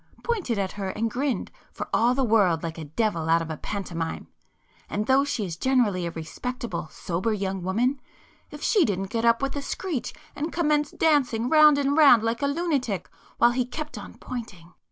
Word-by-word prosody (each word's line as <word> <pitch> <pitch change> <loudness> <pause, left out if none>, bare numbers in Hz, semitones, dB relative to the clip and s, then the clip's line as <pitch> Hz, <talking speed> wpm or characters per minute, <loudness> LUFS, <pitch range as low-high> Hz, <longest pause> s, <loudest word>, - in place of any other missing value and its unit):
Pointed 400 - -1
at 195 -1 -1
her 195 -2 -4
and 225 +3 -2
grinned, 255 -3 -2 0.2
for - - -6
all 240 +2 +3
the 270 - +1
world 200 -8 +3
like 165 0 -5
a 160 - -6
devil 165 0 -1
out 165 0 +4
of 165 - -6
a 155 - -4
pantomime. 175 -5 -4 0.6
And 210 +1 -2
though 265 +3 +4
she 260 -7 -2
is 165 -3 -6
generally 210 -8 +1
a - - -4
respectable 190 - -5
sober 180 +7 -2
young 195 -2 -2
woman, 240 +9 0 0.5
if - - -10
she 410 -5 +4
didn't 195 - -2
get 230 0 -1
up 230 +3 +3
with 275 +1 -1
a 285 - -2
screech 300 -1 -3 0.2
and 310 +3 -3
commence 300 -3 +1
dancing 255 -7 +1
round 305 -2 +7
and 285 0 +1
round 280 -8 +7
like 230 +2 -1
a 280 - +2
lunatic, 280 - -1 0.3
while 240 - +5
he 250 +1 +1
kept 300 +5 -6
on - - -9
pointing. 185 -9 -8
230 Hz, 195 wpm, -25 LUFS, 190-280 Hz, 0.6 s, round